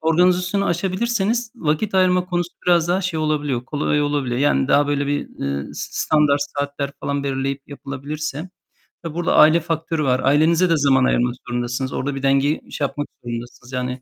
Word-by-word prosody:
organizasyonu 180 Hz, +4 st, +2 dB
aşabilirseniz 215 Hz, +6 st, 0 dB
vakit 160 Hz, +4 st, -1 dB
ayırma 180 Hz, -1 st, +3 dB
konusu 175 Hz, -1 st, -1 dB, 0.2 s
biraz 175 Hz, -1 st, +4 dB
daha 180 Hz, +2 st, +2 dB
şey 180 Hz, -4 st, -2 dB
olabiliyor, 145 Hz, -5 st, -1 dB
kolay 150 Hz, +1 st, 0 dB
olabiliyor. 140 Hz, -4 st, -1 dB
Yani 70 Hz, -, +2 dB
daha 145 Hz, 0 st, +4 dB
böyle 145 Hz, -1 st, 0 dB
bir, 145 Hz, 0 st, -2 dB
ııı, 70 Hz, 0 st, -2 dB
s -, -, -5 dB, 0.2 s
standart 150 Hz, -2 st, +3 dB, 0.2 s
saatler 140 Hz, 0 st, -2 dB
falan 140 Hz, 0 st, -2 dB
belirleyip 135 Hz, 0 st, -2 dB
yapılabilirse, 145 Hz, +4 st, -6 dB, 0.5 s
tabii 165 Hz, -1 st, -6 dB
burada 175 Hz, -1 st, +1 dB
aile 155 Hz, +2 st, +7 dB
faktörü 165 Hz, -1 st, -2 dB
var. 130 Hz, -1 st, +2 dB
Ailenize 160 Hz, +6 st, +3 dB
de 165 Hz, -, +3 dB
zaman 135 Hz, -3 st, +3 dB
ayırmak 120 Hz, -1 st, +2 dB
zorundasınız. 120 Hz, +2 st, -2 dB
Orada 140 Hz, +1 st, -2 dB
bir 135 Hz, -, -6 dB
dengeyi 140 Hz, +2 st, +1 dB
şey 145 Hz, -, 0 dB
yapmak 145 Hz, +1 st, -5 dB, 0.2 s
zorundasınız. 120 Hz, +1 st, -7 dB
Yani, 125 Hz, 0 st, -3 dB
145 Hz, 165 wpm, -21 LUFS, 135-170 Hz, 0.5 s, aile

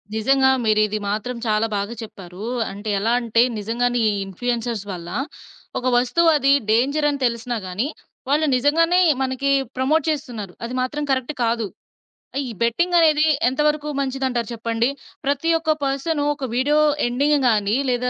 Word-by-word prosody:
నిజంగా 265 Hz, +4 st, +3 dB
మీరిది 215 Hz, -1 st, +2 dB
మాత్రం 215 Hz, +4 st, -3 dB
చాలా 215 Hz, +1 st, +2 dB
బాగా 205 Hz, +4 st, -3 dB
చెప్పారు. 190 Hz, -2 st, -10 dB, 0.3 s
అంటే 205 Hz, +2 st, -6 dB
ఎలా 225 Hz, +3 st, 0 dB
అంటే, 230 Hz, -1 st, +2 dB, 0.2 s
నిజంగానే 240 Hz, +3 st, 0 dB
ఈ -, -, +1 dB
ఇన్‌‌ఫ్లుయెన్సర్స్ 230 Hz, +2 st, -3 dB
వల్ల 170 Hz, -2 st, -7 dB, 0.7 s
ఒక 255 Hz, -, -3 dB
వస్తువది 280 Hz, +2 st, +3 dB, 0.2 s
డేంజర్ 280 Hz, +7 st, +2 dB
అని 285 Hz, -1 st, -2 dB
తెలిసినా 235 Hz, 0 st, -1 dB
గానీ, 200 Hz, +9 st, -2 dB, 0.4 s
వాళ్ళు 300 Hz, +3 st, +3 dB
నిజంగానే 330 Hz, +7 st, +3 dB, 0.2 s
మనకి 265 Hz, +1 st, 0 dB, 0.3 s
ప్రమోట్ 290 Hz, +5 st, +2 dB
చేస్తున్నారు. 245 Hz, -11 st, -4 dB
అది 235 Hz, +2 st, -4 dB
మాత్రం 295 Hz, +4 st, -2 dB
కరెక్ట్ 260 Hz, +2 st, -1 dB
కాదు. 230 Hz, -1 st, 0 dB, 0.7 s
ఆహ్, 280 Hz, -, 0 dB
ఈ -, -, -5 dB
బెట్టింగ్ 345 Hz, +10 st, +1 dB
అనేది 310 Hz, -2 st, +4 dB, 0.2 s
ఎంత 265 Hz, +4 st, -2 dB
వరకు 300 Hz, 0 st, -1 dB
మంచిదంటారు 260 Hz, -3 st, -1 dB
చెప్పండి? 230 Hz, +1 st, -1 dB, 0.4 s
ప్రతి 285 Hz, +4 st, 0 dB
ఒక్క 320 Hz, -1 st, 0 dB
పర్సను 280 Hz, +3 st, -1 dB
ఒక 280 Hz, -2 st, -5 dB
వీడియో 290 Hz, +4 st, +2 dB, 0.3 s
ఎండింగ్ 285 Hz, +5 st, +2 dB
గానీ, 210 Hz, -1 st, +1 dB
లేదా 250 Hz, 0 st, 0 dB
250 Hz, 145 wpm, -21 LUFS, 225-285 Hz, 0.7 s, అనేది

